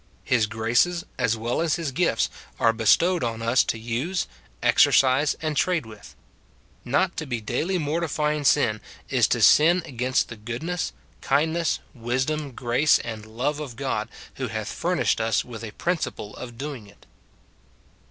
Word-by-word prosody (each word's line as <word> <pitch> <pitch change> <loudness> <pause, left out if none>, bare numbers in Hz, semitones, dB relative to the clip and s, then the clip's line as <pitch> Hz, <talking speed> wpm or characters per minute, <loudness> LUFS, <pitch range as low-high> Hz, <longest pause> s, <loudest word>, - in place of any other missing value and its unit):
His 115 -4 +2
graces, 120 +11 +1
as 115 -3 +1
well 120 +6 -1
as 165 -3 +1
his 165 -5 -3
gifts, 135 -5 +1 0.3
are 115 -1 +4
bestowed 165 - +3
on 115 -1 -3
us 115 +3 +4
to - - -2
use, 120 +11 -2 0.4
exercise, 135 +3 +4
and 155 -1 -1
trade 170 -3 +1
with. 110 -2 -13 0.7
Not 170 +9 +1
to 155 - -4
be 120 -3 -2
daily 155 - -1
mortifying 150 -1 -1
sin, 115 -7 +3 0.3
is - - +3
to - - +1
sin 170 +4 +6
against 130 0 0
the 115 - -8
goodness, 125 +11 -3 0.3
kindness, 160 +3 +1
wisdom, 130 +4 -2
grace, 125 +5 +3
and 110 -2 -7
love 130 +7 -2
of 140 -6 -6
God, 120 -4 -2 0.3
who 130 - -2
hath 110 -1 -4
furnished 175 -8 0
us 110 -2 +1
with 115 -2 -9
a 110 - -5
principle 165 - -3
of 120 -2 -9
doing 135 -5 -6
it. 100 - -20
130 Hz, 150 wpm, -25 LUFS, 115-155 Hz, 0.7 s, sin